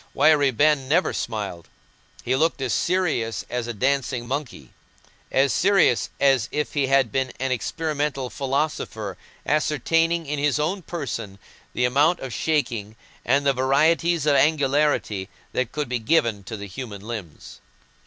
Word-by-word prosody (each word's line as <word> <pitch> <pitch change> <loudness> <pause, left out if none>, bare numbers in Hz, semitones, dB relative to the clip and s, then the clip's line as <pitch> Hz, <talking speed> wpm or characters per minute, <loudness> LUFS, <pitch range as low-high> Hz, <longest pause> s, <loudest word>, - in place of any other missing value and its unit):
Wiry 150 -3 +5
Ben 140 +1 +2
never 175 +5 +2
smiled: 100 -7 -4 0.6
he 130 - +1
looked 160 +2 +1
as 130 -3 -1
serious 170 -11 0
as 120 -1 -2
a - - -2
dancing 130 0 -1
monkey—as 135 - -4
serious 190 - +3
as 135 -5 +3
if 150 0 -2
he 140 -3 +1
had 135 -4 +3
been 130 +1 -1
an 135 0 -1
experimental 145 0 -2
philosopher 135 -8 -2 0.3
ascertaining 165 +3 +1
in 145 0 -3
his 145 0 +1
own 170 +6 -1
person 115 - -5 0.4
the 125 - +2
amount 145 +8 +3
of 130 -3 -6
shaking 120 -9 -1 0.3
and 140 +3 +2
the 140 - +4
varieties 155 +5 +2
of 145 -2 +4
angularity 145 -9 +2 0.2
that 125 -2 -1
could 150 -2 -3
be 125 0 -2
given 115 -5 +1
to 110 +3 -6
the 100 - -7
human 100 0 -7
limbs. 105 -8 -8
135 Hz, 145 wpm, -23 LUFS, 120-150 Hz, 0.6 s, Wiry